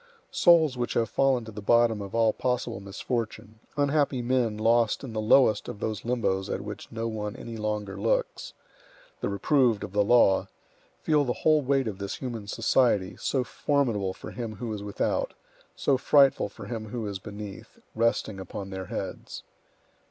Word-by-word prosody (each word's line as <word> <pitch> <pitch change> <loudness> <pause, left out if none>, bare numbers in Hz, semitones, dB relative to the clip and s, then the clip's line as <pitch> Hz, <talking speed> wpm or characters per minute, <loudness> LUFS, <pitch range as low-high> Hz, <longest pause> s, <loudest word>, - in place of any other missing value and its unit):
Souls 160 -7 +5
which 120 - -2
have 115 -1 +1
fallen 135 -4 +2
to 110 - -8
the 105 0 -8
bottom 115 0 +3
of 100 +2 -7
all 115 -1 +3
possible 125 -6 -2
misfortune, 110 +2 -5 0.2
unhappy 145 -2 +2
men 120 -3 +1
lost 115 +2 +2
in 125 -4 -7
the 110 - -1
lowest 110 -1 +4
of 100 - -7
those 110 -2 -3
limbos 115 -6 -1
at - - -2
which - - -8
no 115 0 -3
one 105 -1 -4
any 120 -3 -8
longer 105 -2 -3
looks, 105 +3 -1 0.7
the - - -2
reproved 115 +1 +2
of 105 - -6
the 105 0 +3
law, 100 -3 +4 0.6
feel 150 -2 +3
the 125 -3 -1
whole 155 -1 +5
weight 135 -2 +1
of 100 -3 -5
this 100 -1 -4
human 115 -6 -6
society, 115 -3 +2
so 130 -2 0
formidable 120 -8 0
for - - -9
him 115 -3 -5
who 110 +2 -4
is 105 - -5
without, 100 0 -2 0.4
so 135 -2 +1
frightful 140 -1 +4
for 105 - -11
him 110 0 -5
who 115 +1 -4
is 100 -2 -4
beneath, 105 -1 -9 0.2
resting 110 -3 0
upon 95 +1 -7
their 95 0 -5
heads. - - -6
115 Hz, 175 wpm, -27 LUFS, 105-125 Hz, 0.7 s, Souls